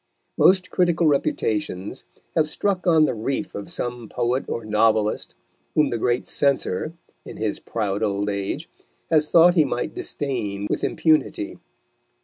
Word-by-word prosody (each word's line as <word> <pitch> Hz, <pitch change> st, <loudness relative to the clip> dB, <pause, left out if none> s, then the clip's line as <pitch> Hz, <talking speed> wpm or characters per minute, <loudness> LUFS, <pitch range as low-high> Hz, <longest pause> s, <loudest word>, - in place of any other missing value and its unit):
Most 185 Hz, -1 st, +4 dB
critical 175 Hz, -2 st, +2 dB
reputations 105 Hz, -, -1 dB, 0.3 s
have 155 Hz, -2 st, +3 dB
struck 185 Hz, +3 st, -1 dB
on 160 Hz, -3 st, +6 dB
the -, -, 0 dB
reef 135 Hz, +8 st, -3 dB
of 100 Hz, -, -7 dB
some 120 Hz, -2 st, -4 dB
poet 125 Hz, +3 st, -1 dB
or 115 Hz, -, -4 dB
novelist 110 Hz, 0 st, +1 dB, 0.4 s
whom 150 Hz, -3 st, +3 dB
the 120 Hz, -, -1 dB
great 120 Hz, +2 st, 0 dB
censor, 140 Hz, -, 0 dB, 0.3 s
in -, -, -10 dB
his 110 Hz, -1 st, -2 dB
proud 105 Hz, -3 st, -2 dB
old 100 Hz, -1 st, 0 dB
age, 100 Hz, -, -3 dB, 0.4 s
has 155 Hz, -1 st, +3 dB
thought 170 Hz, +1 st, +7 dB
he 165 Hz, -3 st, +5 dB
might 125 Hz, -3 st, -2 dB
disdain 105 Hz, -8 st, -3 dB
with -, -, -1 dB
impunity. 155 Hz, -10 st, +1 dB
125 Hz, 140 wpm, -23 LUFS, 105-155 Hz, 0.4 s, thought